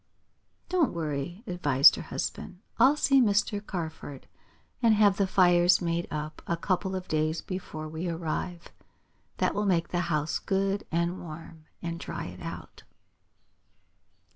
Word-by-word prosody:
"Don't 350 -4 +1
worry," 160 +4 -4
advised 145 - +5
her - - -6
husband. 180 - -5 0.2
"I'll 265 +5 +6
see 275 -2 +4
Mr. 205 -2 +1
Carford, 160 -7 -6 0.6
and 230 -2 +5
have 205 -2 +4
the 200 - +2
fires 175 -1 +5
made 170 -1 -1
up 155 0 -5
a 170 - 0
couple 190 +1 -1
of 185 -1 -5
days 155 +1 0
before 180 -4 -6
we 160 +3 -4
arrive. 170 +1 -4 0.7
That - - +1
will 210 0 -1
make 170 -3 +1
the 175 - -1
house 150 -1 0
good 195 +1 -1
and 170 +2 -1
warm, 160 -1 -10 0.2
and 170 0 -4
dry - - -5
it - - -9
out." - - -8
175 Hz, 140 wpm, -28 LUFS, 160-195 Hz, 0.7 s, I'll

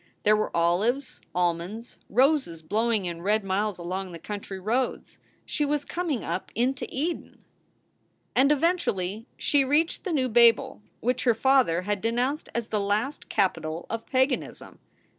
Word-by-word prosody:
There 210 +1 +5
were 215 - 0
olives, 210 +11 +1
almonds 180 +6 -2
roses 260 - +2
blowing 215 +3 0
in 170 -1 -4
red 210 +3 +1
miles 195 +1 -1
along 185 +2 -4
the - - -6
country 200 +2 -6
roads. 235 +7 -2 0.3
She 300 - -1
was 290 0 0
coming 335 -8 -2
up - - -4
into 255 +3 0
Eden. 320 +6 -4 0.9
And 275 +3 +5
eventually 245 - 0
she 285 -2 +3
reached 295 +5 +1
the 375 - -3
new 270 -5 +1
Babel, 235 -2 +4 0.2
which 250 +2 0
her 240 -2 +4
father 250 -9 +3
had 205 0 -1
denounced 245 +6 -1
as 235 -2 -2
the 210 -2 0
last 210 +8 -1
capital 165 -4 0
of 225 0 -4
paganism. 260 +2 -1
225 Hz, 145 wpm, -26 LUFS, 190-265 Hz, 0.9 s, There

